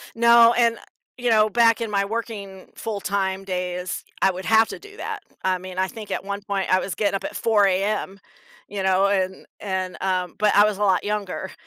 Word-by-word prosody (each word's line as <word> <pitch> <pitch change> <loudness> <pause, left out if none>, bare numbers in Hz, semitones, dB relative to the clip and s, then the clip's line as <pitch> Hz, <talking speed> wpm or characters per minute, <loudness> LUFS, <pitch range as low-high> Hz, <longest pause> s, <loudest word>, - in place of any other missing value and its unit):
No, 235 0 +6
and, 235 -1 +3 0.4
you 245 -1 -1
know, 215 -1 +4
back 230 +1 +3
in 225 - -3
my 200 -1 +1
working 200 -3 -6
full-time 200 -3 -2
days, 180 -1 -4 0.2
I 190 - +4
would 185 +1 -7
have 225 0 +5
to - - -7
do 415 +1 -14
that. - - -5 0.2
I 185 0 +1
mean, 185 0 -9
I 190 0 +1
think 215 -1 -9
at - - -2
one 200 +1 -4
point, 200 -2 -1
I 185 - +5
was 190 - -4
getting 205 -2 0
up - - -3
at - - -5
4 210 -3 +3
AM, 195 +1 -1 0.5
you 200 -1 -4
know, 190 +1 +3
and 190 -1 -1
and, 190 -2 -3
um 185 -2 -1
but 210 0 +2
I 205 - +7
was 210 -2 -1
a 210 - -7
lot 190 -3 +2
younger. 205 -3 -3
200 Hz, 210 wpm, -23 LUFS, 190-220 Hz, 0.5 s, I